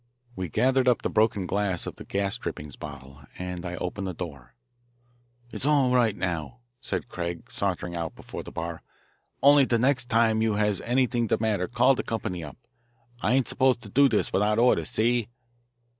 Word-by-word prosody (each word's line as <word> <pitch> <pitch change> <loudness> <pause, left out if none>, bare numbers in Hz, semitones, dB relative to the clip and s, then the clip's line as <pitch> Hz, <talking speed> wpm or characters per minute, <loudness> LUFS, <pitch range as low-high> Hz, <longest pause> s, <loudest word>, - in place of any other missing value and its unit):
We 90 -2 -4
gathered 130 - +2
up 125 - +3
the - - -1
broken 110 -3 +2
glass 95 -2 -1
of - - -7
the - - -8
gas 100 +2 -1
drippings 75 - -6
bottle, 70 -1 -10 0.2
and 90 -1 -5
I 90 0 -4
opened 95 +2 -4
the 90 - -4
door. 75 -9 -8 1.0
"It's 140 - -2
all 140 -4 +3
right, 120 -5 +3
now," 90 +5 -3 0.2
said - - -3
Craig, 85 -5 -5
sauntering 90 -3 -2
out 85 -2 -4
before - - -8
the - - -10
bar. 85 0 -5 0.6
"Only 140 -1 +7
de 120 - +2
next 130 0 +1
time 115 -1 +3
you 110 -1 +2
has 105 -2 +1
anyt'ing 120 -1 +1
de - - +2
matter 105 -5 0
call 125 +2 +4
de - - -2
company 90 -6 -4
up. 75 - -9 0.6
I 115 - +2
ain't 130 -1 +2
supposed 130 -3 +2
to 105 - -10
do 140 +6 +5
dis 110 - 0
wit'out 105 +2 +2
orders, 125 +2 +3
see?" 120 -1 +1
105 Hz, 185 wpm, -26 LUFS, 90-125 Hz, 1.0 s, Only